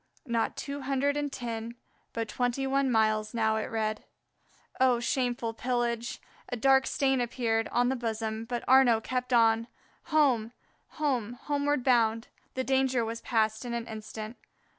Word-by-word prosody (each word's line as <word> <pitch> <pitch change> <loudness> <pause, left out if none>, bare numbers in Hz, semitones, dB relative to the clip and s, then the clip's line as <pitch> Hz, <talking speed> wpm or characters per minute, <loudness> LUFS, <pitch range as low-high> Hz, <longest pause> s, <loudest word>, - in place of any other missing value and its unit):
Not 235 -3 -1
two 280 0 -5
hundred 275 +1 0
and 290 -1 -2
ten, 235 -2 -5 0.4
but 230 -1 -3
twenty 245 +3 -1
one 270 0 +1
miles 215 -1 +1
it - - -2
now 220 -1 +2
read. 215 -1 -2 0.8
Oh, 255 -2 +4
shameful 240 -2 -1
pillage! 240 -1 -2 0.3
A - - -2
dark 265 +2 +4
stain 270 -2 +1
appeared 230 -2 0
on 245 +1 +1
his 265 - -2
bosom, 220 -1 -3
but 240 0 -3
Arnaux 255 -3 +6
kept 255 0 -2
on. 230 -1 +4 0.4
Home, 255 -7 +2 0.4
home, 255 -7 0
homeward 290 -2 0
bound. 230 -3 +2 0.3
The 260 - -1
danger 265 -2 +2
was 230 +1 -5
past 220 -1 0
in 240 -1 -3
an 235 -1 -3
instant. 220 +1 -7
240 Hz, 150 wpm, -29 LUFS, 225-265 Hz, 0.8 s, Arnaux